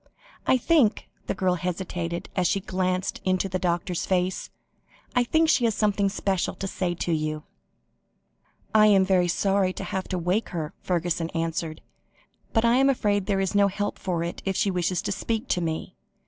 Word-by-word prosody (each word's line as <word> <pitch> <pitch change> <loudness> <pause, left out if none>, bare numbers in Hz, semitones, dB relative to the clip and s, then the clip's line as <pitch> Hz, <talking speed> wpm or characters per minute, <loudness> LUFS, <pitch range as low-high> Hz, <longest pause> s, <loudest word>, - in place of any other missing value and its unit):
I 260 - +5
think," 255 -4 +2 0.2
the - - -1
girl 185 -1 +1
hesitated 175 -1 -3
as 180 -2 +2
she 200 - +1
glanced 185 -1 -2
into 185 +1 +1
the 185 -1 -2
doctor's 175 -1 -1
face, 185 0 0 0.7
"I 245 - +4
think 320 +6 +2
she 270 -6 +3
has 225 -3 +1
something 205 -2 +2
special 195 -2 -1
to - - -5
say 185 -2 -2
to 175 - -2
you." 155 -1 -1 1.3
"I 215 -1 +7
am 195 -2 +5 0.2
sorry 195 +1 +1
to - - -6
have 190 -1 -3
to 185 - -2
wake 180 +6 0
her," 160 -4 -4
Fergusson 175 -2 -1
answered, 165 -1 -2 0.7
"but 225 0 +2
I 235 +2 +4
am 270 +1 +4
afraid 205 -7 +1
there 200 -2 +1
is 190 0 -1
no 200 0 +5
help 205 +1 -3
for 175 -3 -1
it, 170 - -5
if 195 -1 -1
she 200 - +1
wishes 180 0 0
to - - -2
speak 220 +3 -2
to 180 - +1
me. 160 -1 -3
185 Hz, 180 wpm, -26 LUFS, 175-205 Hz, 1.3 s, I